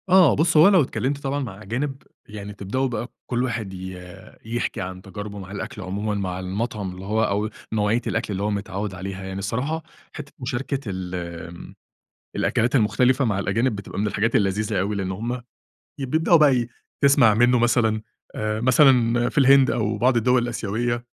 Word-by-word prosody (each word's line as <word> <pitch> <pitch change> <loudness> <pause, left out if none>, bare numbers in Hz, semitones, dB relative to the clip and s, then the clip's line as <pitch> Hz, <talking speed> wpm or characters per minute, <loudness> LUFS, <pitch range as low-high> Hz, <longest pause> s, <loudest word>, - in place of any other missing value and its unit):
آه 185 -4 +6
بُص 160 +1 +2
هو 155 +5 +8
لو 190 -4 +5
اتكلمْت 135 0 -1
طبعًا 140 0 -2
مع 110 -7 -6
أجانب 135 +6 -3 0.2
يعني 105 -1 -8
تبدأوا 100 +7 -2
بقى 120 -1 -3 0.2
كل 125 0 0
واحد 115 -6 -3
ي 90 -1 -8 0.3
يحْكِي 120 -1 -2
عن 95 0 -6
تجاربه 105 +1 -7
مع 95 0 -9
الأكل 105 +1 -6
عمومًا 100 +3 -3
مع 95 -2 -3
المطعم 100 +1 -3
اللي 95 +1 -9
هو 110 +2 +1
أو 105 +1 0 0.2
نوعية 110 +2 +1
الأكل 115 -2 -2
اللي 100 0 -2
هو 105 - +1
متعوّد 100 0 -3
عليها. 95 +1 -6
يعني 95 0 -5
الصراحة 130 +11 -2 0.3
حتة 145 -2 -8
مشاركة 135 +2 -2
ال 95 -2 -4 0.3
آمم 85 0 -11 0.6
الأكلات 120 +4 +1
المختلفة 125 +4 +3
مع 105 -5 0
الأجانب 110 +5 0
بتبقى 100 - -7
من 105 - +1
الحاجات 110 +2 +1
اللذيذة 100 0 0
أوي 100 +3 -1
لإن 95 -2 -2
هم 120 +5 -4 0.6
ي 135 - -3
بيبدأوا 160 +5 +4
بقى 135 -6 +4 0.3
تسْمَع 140 -6 +5
منه 120 +3 +4
مثلًا 115 -2 +2 0.3
آآ، 110 0 -2
مثلًا 120 -2 +4
في - - -2
الهند 135 -1 +6
أو 110 -3 -1
بعض 125 +3 +3
الدول 125 +2 +3
الآسيوية 120 +1 -2
110 Hz, 175 wpm, -23 LUFS, 100-125 Hz, 0.6 s, هو